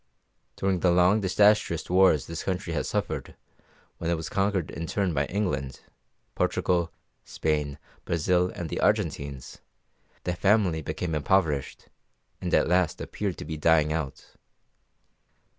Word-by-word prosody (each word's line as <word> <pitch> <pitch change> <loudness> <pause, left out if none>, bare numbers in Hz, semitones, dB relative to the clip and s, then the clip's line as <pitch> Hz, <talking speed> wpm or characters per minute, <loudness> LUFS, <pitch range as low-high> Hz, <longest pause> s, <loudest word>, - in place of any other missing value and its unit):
During 95 -2 0
the 90 - +3
long, 90 +4 +4
disastrous 100 -2 +3
wars 90 -5 +4
this 85 -1 -6
country 95 -2 -2
has - - -2
suffered, - - -3 0.6
when 85 - -2
it 85 - +2
was 80 -4 -5
conquered 95 -3 0
in 80 - -5
turn 95 -2 0
by 70 -1 0
England, 70 -10 -2 0.5
Portugal, 85 -2 0 0.3
Spain, 75 -2 -2 0.3
Brazil, 90 +2 +1
and 85 - -4
the - - -3
Argentines, 70 -2 -1 0.6
the 90 - -1
family 95 -3 +2
became 80 +2 -4
impoverished, 75 -2 0 0.5
and - - -3
at - - +3
last 90 -2 +1
appeared 100 -4 -4
to - - -7
be 80 - -5
dying 75 -1 +3
out. 75 -4 -5
85 Hz, 135 wpm, -27 LUFS, 75-95 Hz, 0.6 s, long